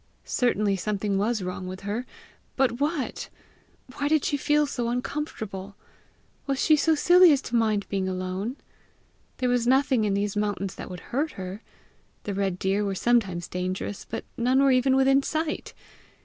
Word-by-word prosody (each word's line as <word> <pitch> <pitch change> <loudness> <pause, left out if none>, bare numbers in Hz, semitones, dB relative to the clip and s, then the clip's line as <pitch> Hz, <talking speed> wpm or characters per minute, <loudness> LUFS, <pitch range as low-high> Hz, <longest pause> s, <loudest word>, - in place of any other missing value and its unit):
Certainly 210 -5 +1
something 200 0 -1
was 215 0 0
wrong 185 0 -5
with 185 +1 -7
her 210 +6 -3 0.5
but 255 -3 +1
what? 295 -1 -2 0.7
Why 285 - 0
did 310 -1 +2
she 290 - +1
feel 295 +1 +2
so 245 -4 -2
uncomfortable? 220 -7 -4 0.7
Was 275 -1 0
she 310 - +5
so 315 +2 +3
silly 355 +3 +7
as 275 -4 0
mind 215 -3 +1
being 190 -2 -1
alone? 185 +6 -3 0.8
There 255 - 0
was 245 -1 +1
nothing 260 -2 +3
in 205 -2 +1
these 200 +1 -1
mountains 205 -2 -1
that - - -8
would 180 -1 -8
hurt 295 +5 0
her! 190 +2 -7 0.6
The 205 - -3
red 195 -2 -1
deer 195 +2 0
were 200 -1 -2
sometimes 195 -6 +1
dangerous, 185 +2 -4
but - - -5
none 255 +3 +3
were 275 - +5
even 260 +1 +3
within 270 +1 +4
sight! 315 +2 -3
230 Hz, 165 wpm, -26 LUFS, 195-270 Hz, 0.8 s, silly